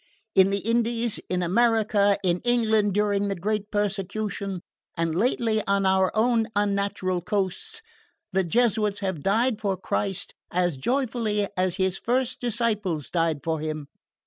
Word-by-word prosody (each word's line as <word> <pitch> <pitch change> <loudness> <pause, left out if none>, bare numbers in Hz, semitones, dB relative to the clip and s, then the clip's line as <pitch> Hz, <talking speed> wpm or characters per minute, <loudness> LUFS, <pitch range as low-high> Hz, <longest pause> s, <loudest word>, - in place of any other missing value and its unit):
In 190 0 +6
the 200 0 -1
Indies, 235 0 0
in 180 -1 0
America, 205 0 +3
in 180 -1 +1
England 220 -4 +2
during 205 -1 +1
the 200 - -1
great 210 +3 -2
persecution, 200 -2 -2 0.3
and 165 -1 0
lately 220 +2 +1
on 200 0 +2
our 190 0 +3
own 225 0 +2
unnatural 200 -3 0
coasts, 210 - -2 0.5
the 190 0 +2
Jesuits 210 +1 +1
have 190 -6 -2
died 220 - +1
for 195 -3 0
Christ 195 0 -2 0.2
as 175 -4 0
joyfully 225 - 0
as 185 -1 +1
His 190 -1 0
first 255 +1 0
disciples 210 - -1
died 165 -4 0
for 160 -1 -1
Him. 155 -1 -4
200 Hz, 140 wpm, -25 LUFS, 185-225 Hz, 0.5 s, In